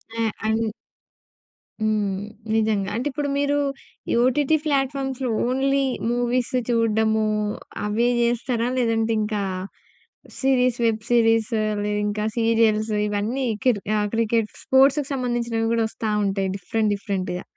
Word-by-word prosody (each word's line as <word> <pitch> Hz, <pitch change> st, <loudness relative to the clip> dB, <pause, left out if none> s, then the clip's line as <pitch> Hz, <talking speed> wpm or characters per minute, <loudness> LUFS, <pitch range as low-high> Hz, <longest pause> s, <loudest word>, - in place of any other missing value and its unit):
ఆ -, -, -4 dB, 0.3 s
అని 220 Hz, +1 st, +1 dB, 1.1 s
హ్మ్ 215 Hz, -2 st, +1 dB, 0.4 s
నిజంగా. 215 Hz, -3 st, +1 dB
అంటే 245 Hz, +5 st, -1 dB
ఇప్పుడు 285 Hz, +2 st, -2 dB
మీరు 285 Hz, 0 st, +1 dB, 0.5 s
ఈ -, -, +2 dB
ఓటీటీ 285 Hz, +4 st, +2 dB
ఫ్లాట్‍ఫామ్స్‌లో 270 Hz, -2 st, -1 dB, 0.2 s
ఓన్లీ 275 Hz, +2 st, +1 dB, 0.3 s
మూవీస్ 245 Hz, +1 st, 0 dB, 0.2 s
చూడ్డము 220 Hz, -2 st, +2 dB, 0.6 s
అవే 215 Hz, +3 st, +1 dB
జేస్తారా? 235 Hz, 0 st, 0 dB
లేదంటే 230 Hz, -2 st, +1 dB
ఇంకా 210 Hz, -1 st, -1 dB, 1.0 s
సీరీస్ 255 Hz, -2 st, +2 dB
వెబ్ 220 Hz, -1 st, +1 dB
సీరీస్ 225 Hz, -1 st, +3 dB, 0.3 s
లేదింకా 210 Hz, 0 st, -1 dB
సీరియల్స్ 225 Hz, -1 st, +2 dB, 0.2 s
ఇవన్నీ 210 Hz, +6 st, -1 dB, 0.2 s
కిర్ 235 Hz, -6 st, +3 dB, 0.3 s
క్రికెట్ 225 Hz, -1 st, +1 dB, 0.2 s
స్పోర్ట్స్‌కి 270 Hz, +2 st, +4 dB
సంబంధించినవి 240 Hz, -3 st, -1 dB
కూడా 230 Hz, -1 st, +2 dB
వస్తా 220 Hz, 0 st, -4 dB, 0.2 s
ఉంటాయి. 195 Hz, -1 st, 0 dB
డిఫరెంట్ 215 Hz, +2 st, -1 dB
డిఫరెంట్‌గా. 190 Hz, -3 st, -3 dB
230 Hz, 110 wpm, -23 LUFS, 215-255 Hz, 1.1 s, స్పోర్ట్స్‌కి